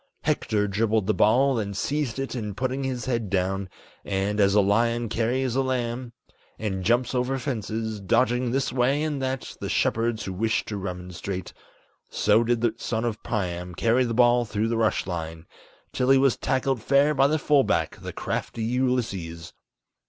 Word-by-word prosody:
Hector 105 Hz, -1 st, 0 dB
dribbled 110 Hz, +1 st, +1 dB
the 110 Hz, -, +2 dB
ball, 135 Hz, +7 st, +4 dB
then 105 Hz, -4 st, -2 dB
seized 140 Hz, +2 st, -1 dB
it 135 Hz, 0 st, -3 dB
and 105 Hz, -5 st, -4 dB
putting 130 Hz, +1 st, -1 dB
his 130 Hz, -2 st, -3 dB
head 115 Hz, -5 st, -1 dB
down, 95 Hz, 0 st, -1 dB, 0.3 s
And, 100 Hz, +2 st, -1 dB
as 100 Hz, 0 st, +4 dB
a -, -, +6 dB
lion 115 Hz, +3 st, +2 dB
carries 125 Hz, +3 st, 0 dB
a 135 Hz, -, +3 dB
lamb 125 Hz, -1 st, -2 dB, 0.5 s
and 95 Hz, -4 st, -3 dB
jumps 120 Hz, +6 st, +2 dB
over 130 Hz, +1 st, 0 dB
fences 110 Hz, -3 st, -3 dB
Dodging 125 Hz, +5 st, +2 dB
this 135 Hz, 0 st, -1 dB
way 135 Hz, +4 st, +2 dB
and 150 Hz, -3 st, -2 dB
that 130 Hz, -1 st, -3 dB
the -, -, -3 dB
shepherds 115 Hz, 0 st, 0 dB
who 95 Hz, -, -4 dB
wish 110 Hz, +4 st, 0 dB
to 105 Hz, -, -4 dB
remonstrate 90 Hz, 0 st, -5 dB, 0.6 s
So 105 Hz, +2 st, +3 dB
did 120 Hz, 0 st, 0 dB
the 120 Hz, -2 st, +2 dB
son 115 Hz, 0 st, -2 dB
of 110 Hz, -2 st, -3 dB
Priam 90 Hz, -4 st, -3 dB
carry 120 Hz, +6 st, +3 dB
the 115 Hz, -2 st, -2 dB
ball 120 Hz, 0 st, +5 dB
through 110 Hz, 0 st, -1 dB
the 115 Hz, -, 0 dB
rush 110 Hz, -1 st, +1 dB
line, 80 Hz, -2 st, -5 dB, 0.5 s
Till 125 Hz, 0 st, 0 dB
he 135 Hz, -, +7 dB
was 135 Hz, -2 st, +3 dB
tackled 130 Hz, -2 st, 0 dB
fair 140 Hz, +5 st, +3 dB
by 135 Hz, -1 st, +4 dB
the 155 Hz, +2 st, +1 dB
full 145 Hz, -2 st, +3 dB
back, -, -, 0 dB
the -, -, -7 dB
crafty 115 Hz, -, -4 dB
Ulysses. 110 Hz, -9 st, -2 dB
115 Hz, 175 wpm, -25 LUFS, 100-130 Hz, 0.6 s, he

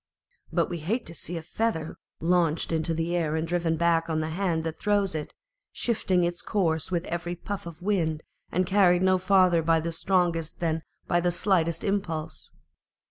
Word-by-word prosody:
But -, -, +2 dB
we 175 Hz, -1 st, -4 dB
hate 220 Hz, +10 st, -1 dB
to 165 Hz, -, -7 dB
see 170 Hz, 0 st, -5 dB
a 165 Hz, -, -6 dB
feather 175 Hz, -3 st, -2 dB, 0.2 s
launched 170 Hz, -2 st, +2 dB
into 160 Hz, 0 st, 0 dB
the 165 Hz, +2 st, -1 dB
air 160 Hz, -3 st, 0 dB
and 160 Hz, +1 st, -1 dB
driven 170 Hz, -1 st, 0 dB
back 165 Hz, 0 st, +2 dB
on 160 Hz, -, 0 dB
the 155 Hz, 0 st, -1 dB
hand 170 Hz, -2 st, 0 dB
that 160 Hz, -1 st, -4 dB
throws 205 Hz, -3 st, +1 dB
it, 155 Hz, -2 st, -4 dB, 0.4 s
shifting 190 Hz, -6 st, +1 dB
its 175 Hz, 0 st, -1 dB
course 165 Hz, -7 st, 0 dB
with 175 Hz, -2 st, -1 dB
every 175 Hz, +1 st, -3 dB
puff 195 Hz, +1 st, -6 dB
of 170 Hz, +1 st, -10 dB
wind, 165 Hz, -6 st, 0 dB, 0.3 s
and 185 Hz, +2 st, +1 dB
carried 180 Hz, -2 st, +4 dB
no 185 Hz, 0 st, +4 dB
farther 185 Hz, -2 st, +4 dB
by 165 Hz, 0 st, +3 dB
the 165 Hz, +1 st, -3 dB
strongest 165 Hz, -2 st, 0 dB
than 160 Hz, -1 st, 0 dB, 0.2 s
by 175 Hz, -, +2 dB
the 175 Hz, -, +2 dB
slightest 170 Hz, -2 st, +1 dB
impulse. 165 Hz, -6 st, -2 dB
170 Hz, 185 wpm, -27 LUFS, 160-185 Hz, 0.4 s, carried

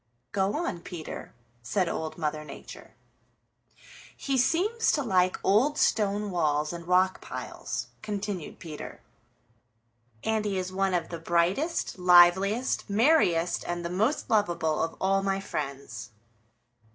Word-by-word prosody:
"Go 200 Hz, +1 st, 0 dB
on, 335 Hz, -, -2 dB
Peter," 170 Hz, -2 st, -8 dB, 0.3 s
said 180 Hz, -, 0 dB
Old 160 Hz, -1 st, -4 dB
Mother 155 Hz, -2 st, -2 dB
Nature. 150 Hz, -, -11 dB, 1.2 s
"He 275 Hz, -, -1 dB
seems 370 Hz, -, +2 dB
to 290 Hz, -, +1 dB
like 185 Hz, -5 st, +2 dB
old 255 Hz, +10 st, +3 dB
stone 205 Hz, -1 st, +1 dB
walls 150 Hz, -3 st, 0 dB
and 170 Hz, 0 st, -8 dB
rock 185 Hz, +1 st, +3 dB
piles," -, -, -5 dB, 0.2 s
continued 205 Hz, -5 st, -4 dB
Peter, 155 Hz, -3 st, -8 dB, 1.2 s
"and 220 Hz, -1 st, 0 dB
he 200 Hz, -2 st, -1 dB
is 185 Hz, 0 st, -3 dB
one 190 Hz, -1 st, +1 dB
of 175 Hz, -, -1 dB
the 170 Hz, -, -5 dB
brightest, 180 Hz, -, 0 dB
liveliest, 180 Hz, +8 st, +5 dB
merriest 200 Hz, -, +3 dB
and 175 Hz, 0 st, -3 dB
the 170 Hz, -, -3 dB
most 220 Hz, +11 st, 0 dB
lovable 175 Hz, -7 st, +1 dB
of 165 Hz, -, -2 dB
all 195 Hz, +1 st, +2 dB
my 195 Hz, 0 st, 0 dB
friends." 135 Hz, -, -5 dB
185 Hz, 125 wpm, -28 LUFS, 170-210 Hz, 1.2 s, liveliest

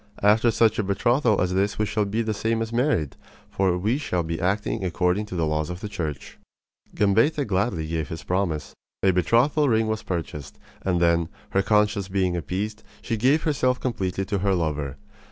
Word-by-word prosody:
After 110 Hz, +3 st, +5 dB
such 110 Hz, -1 st, +3 dB
a -, -, +2 dB
betrothal 115 Hz, +4 st, +2 dB
as 90 Hz, 0 st, +1 dB
this 100 Hz, +2 st, 0 dB
we 105 Hz, -, +1 dB
shall 105 Hz, 0 st, 0 dB
be 110 Hz, +3 st, -1 dB
the 110 Hz, -1 st, -1 dB
same 115 Hz, +2 st, 0 dB
as 115 Hz, +1 st, -7 dB
married; 120 Hz, -, +1 dB, 0.4 s
for 95 Hz, -2 st, +1 dB
we 110 Hz, +9 st, 0 dB
shall 90 Hz, -, -1 dB
be 80 Hz, 0 st, -4 dB
acting 100 Hz, +2 st, -1 dB
according 90 Hz, +3 st, 0 dB
to 95 Hz, -, -6 dB
the 85 Hz, -2 st, +1 dB
laws 75 Hz, 0 st, -1 dB
of 90 Hz, 0 st, -5 dB
the 105 Hz, -, -5 dB
Church." 80 Hz, -8 st, -5 dB, 0.6 s
Gambetta 115 Hz, +9 st, +3 dB
gladly 95 Hz, -4 st, 0 dB
gave 80 Hz, -1 st, -2 dB
his 80 Hz, -2 st, -6 dB
promise. 90 Hz, -3 st, -2 dB, 0.3 s
A 95 Hz, -, +5 dB
betrothal 125 Hz, -, +3 dB
ring 110 Hz, -1 st, +3 dB
was 110 Hz, 0 st, -2 dB
purchased; 80 Hz, -7 st, -5 dB, 0.2 s
and 90 Hz, -2 st, 0 dB
then, 85 Hz, -1 st, +2 dB, 0.2 s
her 95 Hz, -, +3 dB
conscience 105 Hz, -1 st, +2 dB
being 95 Hz, -2 st, 0 dB
appeased, 95 Hz, +7 st, -3 dB, 0.2 s
she 115 Hz, -, -1 dB
gave 130 Hz, +8 st, +2 dB
herself 130 Hz, -5 st, +1 dB
completely 95 Hz, -6 st, -2 dB
to 100 Hz, 0 st, -1 dB
her 100 Hz, 0 st, +1 dB
lover. 75 Hz, -5 st, -2 dB
100 Hz, 190 wpm, -24 LUFS, 90-110 Hz, 0.6 s, After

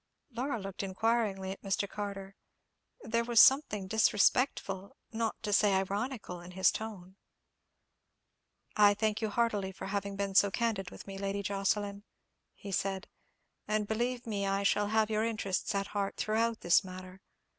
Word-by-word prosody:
Laura 250 Hz, 0 st, -2 dB
looked 195 Hz, -1 st, -6 dB
inquiringly 195 Hz, -1 st, 0 dB
at 195 Hz, -, -8 dB
Mr. 195 Hz, 0 st, -1 dB
Carter. 195 Hz, -1 st, -6 dB, 0.7 s
There 230 Hz, +1 st, 0 dB
was 235 Hz, -1 st, +3 dB
something 265 Hz, -8 st, +5 dB
disrespectful, 205 Hz, -2 st, +1 dB, 0.2 s
not 225 Hz, 0 st, -1 dB
to 205 Hz, -, -1 dB
say 205 Hz, -1 st, +4 dB
ironical, 200 Hz, -1 st, -3 dB
in 175 Hz, +1 st, -11 dB
his 190 Hz, 0 st, +4 dB
tone. 195 Hz, -4 st, -7 dB, 1.6 s
"I 205 Hz, -1 st, +6 dB
thank 215 Hz, +1 st, 0 dB
you 220 Hz, -, 0 dB
heartily 205 Hz, -4 st, 0 dB
for 190 Hz, -, -8 dB
having 200 Hz, 0 st, -3 dB
been 200 Hz, 0 st, -2 dB
so 200 Hz, +1 st, +5 dB
candid 200 Hz, -3 st, -1 dB
with -, -, -11 dB
me, 195 Hz, -1 st, -7 dB
Lady 200 Hz, 0 st, -2 dB
Jocelyn," 200 Hz, +1 st, -1 dB, 0.5 s
he 200 Hz, -, -8 dB
said; 190 Hz, +1 st, -2 dB, 0.6 s
"and 215 Hz, -1 st, 0 dB
believe 240 Hz, +3 st, -1 dB
me 200 Hz, -3 st, -2 dB
I 195 Hz, +1 st, 0 dB
shall 205 Hz, +1 st, +2 dB
have 220 Hz, 0 st, +1 dB
your 215 Hz, 0 st, +1 dB
interests 210 Hz, -3 st, -1 dB
at 200 Hz, 0 st, -1 dB
heart 200 Hz, -1 st, -2 dB
throughout 225 Hz, +1 st, 0 dB
this 175 Hz, +4 st, +4 dB
matter. 185 Hz, 0 st, -10 dB
200 Hz, 155 wpm, -31 LUFS, 195-220 Hz, 1.6 s, I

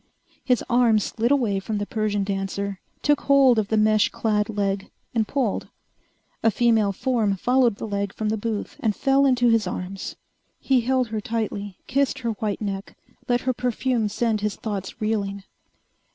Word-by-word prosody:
His 250 Hz, -3 st, +2 dB
arm 240 Hz, -2 st, +4 dB
slid 225 Hz, +2 st, 0 dB
away 235 Hz, -8 st, +2 dB
from 210 Hz, +2 st, -3 dB
the 205 Hz, -, -2 dB
Persian 210 Hz, -2 st, -1 dB
dancer, 195 Hz, 0 st, -3 dB, 0.2 s
took 295 Hz, -1 st, +3 dB
hold 270 Hz, -4 st, +5 dB
of 210 Hz, -, -1 dB
the 220 Hz, -, +1 dB
mesh 215 Hz, 0 st, +4 dB
clad 210 Hz, -2 st, 0 dB
leg, 200 Hz, -2 st, -1 dB, 0.2 s
and 220 Hz, -3 st, +1 dB
pulled. 255 Hz, -8 st, -1 dB, 0.7 s
A 225 Hz, -, +4 dB
female 220 Hz, -2 st, +3 dB
form 215 Hz, -2 st, 0 dB
followed 245 Hz, +1 st, +3 dB
the -, -, -6 dB
leg 200 Hz, -2 st, -2 dB
from 215 Hz, +1 st, -3 dB
the 220 Hz, -, +1 dB
booth 220 Hz, -1 st, -4 dB
and 215 Hz, -3 st, 0 dB
fell 275 Hz, 0 st, +3 dB
into 245 Hz, -2 st, +3 dB
his 225 Hz, -4 st, +3 dB
arms. 185 Hz, +2 st, -5 dB, 0.4 s
He 265 Hz, -2 st, +2 dB
held 255 Hz, 0 st, +1 dB
her 215 Hz, -1 st, -3 dB
tightly, 210 Hz, -4 st, -3 dB
kissed 275 Hz, +1 st, +1 dB
her 235 Hz, -3 st, -2 dB
white 215 Hz, -1 st, -3 dB
neck, 195 Hz, -1 st, -5 dB, 0.3 s
let 245 Hz, 0 st, +2 dB
her 255 Hz, -, 0 dB
perfume 245 Hz, -2 st, 0 dB
send 220 Hz, 0 st, 0 dB
his 210 Hz, -1 st, -1 dB
thoughts 205 Hz, -1 st, -5 dB
reeling. 200 Hz, -3 st, -2 dB
220 Hz, 170 wpm, -24 LUFS, 200-245 Hz, 0.7 s, hold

